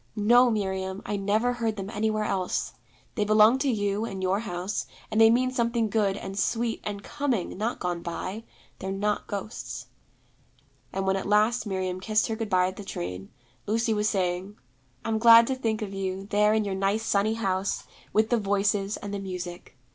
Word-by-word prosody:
'No, 240 +4 +5
Miriam, 190 -2 -2
I 205 - -2
never 210 +5 +1
heard 230 -3 -1
them 195 0 -5
anywhere 215 -1 0
else. 185 -3 -1 0.4
They 210 - 0
belong 215 +4 +5
to 275 - +1
you 205 -2 0
and 195 -4 -4
your 190 +2 +1
house, 190 -2 -3 0.2
and 220 - +3
they 225 - +8
mean 255 +2 +3
something 235 -3 0
good, 205 -3 +1
and 195 0 -5
sweet, 230 +2 0
and 200 -1 -5
coming, 270 -9 -2
not 220 +5 -2
gone 175 -1 -2
by. 185 +5 -5 0.4
They're 190 - -4
not 205 +2 -1
ghosts.' 205 +3 -5 1.1
And 195 0 -2
when 190 0 +2
at 195 - -4
last 215 +3 +3
Miriam 185 -2 -2
kissed 215 +3 +1
her 225 - -1
good 220 -1 -4
bye 185 -2 +3
at 185 +1 -4
the 205 - -7
train, 90 - -5 0.4
Lucy 225 +2 +1
was 210 0 +1
saying, 185 +1 -2 0.5
'I'm 220 -1 0
glad 230 0 +9
to 265 - -1
think 225 -4 -1
of 200 -2 -6
you, 190 0 -3
there 210 +1 +4
in 215 -1 +1
your 200 - -2
nice 195 +3 0
sunny 210 +1 +2
house, 195 -3 -1 0.3
with 220 +2 +2
the 240 - +4
Voices, 200 0 0
and 205 0 -7
the 200 - -2
Music. 180 -6 -7
205 Hz, 190 wpm, -27 LUFS, 190-225 Hz, 1.1 s, glad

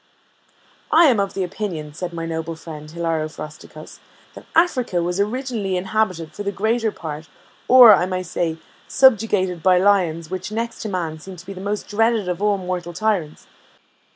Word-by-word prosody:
"I 330 +2 +7
am 250 -8 +4
of 200 -1 -2
opinion," 180 -5 -4
said 175 +2 -5
my 165 -1 -5
noble 165 0 -4
friend, 150 -1 -10
Hilaro 165 -1 -2
Frosticos, 155 -1 -11 0.3
"that - - -13
Africa 255 - +2
was 175 +2 -2
originally 215 -3 -1
inhabited 185 -4 -1
for - - -7
the 200 0 -2
greater 220 +3 0
part, 155 -3 -7 0.4
or, 245 -4 +9
I 180 - +2
may 185 0 -2
say, 170 -2 -2 0.3
subjugated 210 -9 +3
by 185 +1 +4
lions 180 -4 +2
which, 185 +2 -5
next 230 +2 -4
to 220 - -4
man, 165 -5 -3
seem 190 +4 -10
to 175 0 -13
be 195 - -7
the 185 - -9
most 205 +1 -3
dreaded 225 -1 +1
of 180 +1 -3
all 205 -1 +2
mortal 180 -2 -4
tyrants. 180 -5 -2
185 Hz, 170 wpm, -21 LUFS, 165-215 Hz, 0.4 s, or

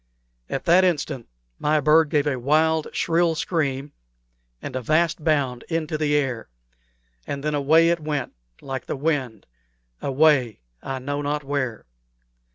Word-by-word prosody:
At 135 - -3
that 180 +2 +5
instant 145 -8 -1 0.3
my 150 +1 +2
bird 155 +1 +4
gave 150 -2 +1
a 135 -4 -1
wild, 155 +4 +2
shrill 170 -1 +1
scream 145 -4 -2 0.7
and 125 - -7
a 130 - -2
vast 155 +4 +1
bound 140 -6 +1
into 160 -2 -2
the 150 -1 +1
air, 130 - -1 0.8
and 140 0 -4
then 150 0 -1
away 155 +4 +4
it 170 0 +1
went 150 -4 -3 0.3
like 135 -2 -6
the - - -2
wind 135 -7 -2 0.6
away, 135 - +2 0.2
I 135 - -4
know 145 +3 -3
not 145 +1 -2
where. 135 -5 -3
145 Hz, 145 wpm, -23 LUFS, 135-160 Hz, 0.8 s, that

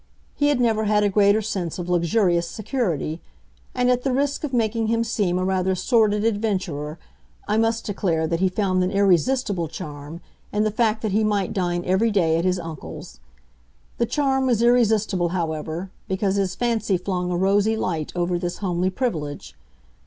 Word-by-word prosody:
He 290 - +1
had 290 -3 +2
never 220 -3 +2
had 210 0 +3
a 205 - +3
greater 205 +2 +3
sense 185 -6 -3
of 175 -1 -5
luxurious 175 0 +2
security; 180 - -2 0.5
and 250 0 +2
at 250 0 +1
the 270 - -1
risk 280 +3 0
of 300 - -2
making 225 -2 0
him 230 +1 +1
seem 205 -6 0
a 185 - 0
rather 190 0 +1
sordid 210 +1 +2
adventurer 185 -9 -1 0.5
I 210 - +1
must 225 0 +1
declare 175 -6 0
that 165 +1 -1
he 190 0 +3
found 185 -1 +1
an 180 - 0
irresistible 200 0 +2
charm 150 0 -8 0.3
in 210 +1 +1
the 215 - +1
fact 220 0 0
that 215 - 0
he 215 +3 +2
might 205 -3 0
dine 175 -2 -1
every 190 +5 +2
day 165 -6 +2
at 170 - -1
his 185 0 +2
uncle's. 165 -4 -8 0.8
The 235 - +2
charm 265 -2 +1
was 235 -2 +2
irresistible, 220 -7 +3
however, 160 +2 -3 0.2
because 190 +1 0
his 195 -2 0
fancy 225 -5 0
flung 180 0 -2
a 175 - -1
rosy 200 +4 +2
light 165 -7 -2
over 175 0 0
this 175 0 -3
homely 180 -2 0
privilege. 160 - -3
195 Hz, 175 wpm, -23 LUFS, 175-225 Hz, 0.8 s, had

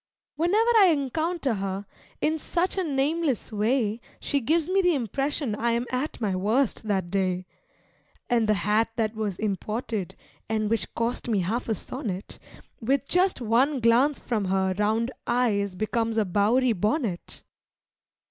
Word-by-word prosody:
Whenever 415 +8 +3
I 400 -3 +8
encounter 315 -1 0
her, 195 0 -3 0.4
in 315 +1 +1
such 350 +4 -1
a 380 - 0
nameless 290 - 0
way 220 +1 0 0.2
She 285 - 0
gives 310 +6 +1
me 385 +2 +3
the 355 -3 +3
impression 270 +1 -1
I 235 +2 0
am 235 +1 0
at 255 +4 -2
my 205 -5 0
worst 220 +4 0
that 190 -4 -1
day. 185 -2 0 0.8
And 230 -3 +2
the 215 - +4
hat 210 +5 +1
that 220 -2 0
was 215 -4 -3
imported 215 -1 -3 0.3
(and 215 -1 0
which 220 -6 0
cost 235 +1 -2
me 210 -4 +2
half 225 +7 -2
a 220 - +1
sonnet), 205 -5 -5 0.4
With 270 +4 0
just 365 -5 +2
one 255 +5 +2
glance 245 +5 +4
from 220 -5 -2
her 190 0 +1
round 220 +4 +1 0.2
eyes 210 -6 +1
becomes 225 +3 -1
a 220 - +3
Bowery 225 +7 +2
bonnet. 210 - -2
230 Hz, 150 wpm, -26 LUFS, 210-275 Hz, 0.8 s, I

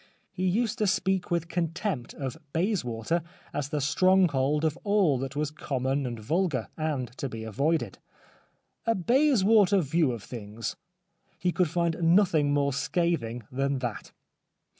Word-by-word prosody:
He 185 +1 -1
used 230 +5 0
to 210 - +2
speak 190 -2 0
with 170 -1 0
contempt 170 - -2
of 130 -3 -4 0.2
Bayswater 165 - 0 0.3
as 140 -1 -2
the 150 - -1
stronghold 150 -2 +3
of 155 -1 +1
all 200 -10 +3
that 135 +1 -5
was 150 0 -1
common 135 -2 -2
and 120 -1 -4
vulgar, 155 - -1
and 140 -6 -3
to 140 - -2
be 115 -2 -6
avoided. 140 +10 -1 0.4
" - - -39
A 230 - +3
Bayswater 215 - +4
view 155 -2 +1
of 115 -4 -6
things 115 -1 -6 0.2
" 180 -1 -51
— - - -39
he 180 - +3
could 180 -2 +1
find 170 0 0
nothing 165 -4 +4
more 140 -1 +1
scathing 140 -6 -1
than 135 +1 0
that. 120 -4 -5
155 Hz, 155 wpm, -28 LUFS, 130-185 Hz, 0.4 s, Bayswater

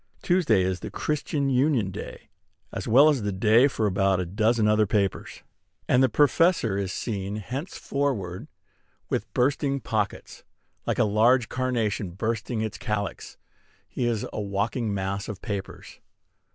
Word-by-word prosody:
Tuesday 155 - +3
is 90 -1 -1
"The - - -6
Christian 150 -1 -2
Union" 125 -6 +2
day, - - -9 0.4
as - - -5
well 135 +7 +7
as 145 -5 +2
the 105 0 -1
day 110 +7 +4
for 115 -5 -1
about 95 -1 +2
a 90 - -1
dozen 110 +4 +1
other 105 0 +3
papers; 100 -2 -1 0.4
and 125 - +4
the 130 - +4
Professor 145 - +3
is 100 -2 -2
seen 100 -2 -3
henceforward 125 - -3 0.6
with - - -2
bursting 140 +2 +1
pockets, 105 -5 -3 0.4
like - - 0
a - - +4
very 105 -2 -1
large 120 +2 +4
carnation 115 -6 -1
bursting 110 +3 -2
its 110 -1 -4
calyx. 105 -4 -4 0.5
He 120 - -2
is 115 -3 -1
a - - -3
walking 105 +3 -1
mass 100 +1 -3
of 105 -3 -6
papers. 100 -2 -6
110 Hz, 150 wpm, -26 LUFS, 100-130 Hz, 0.6 s, well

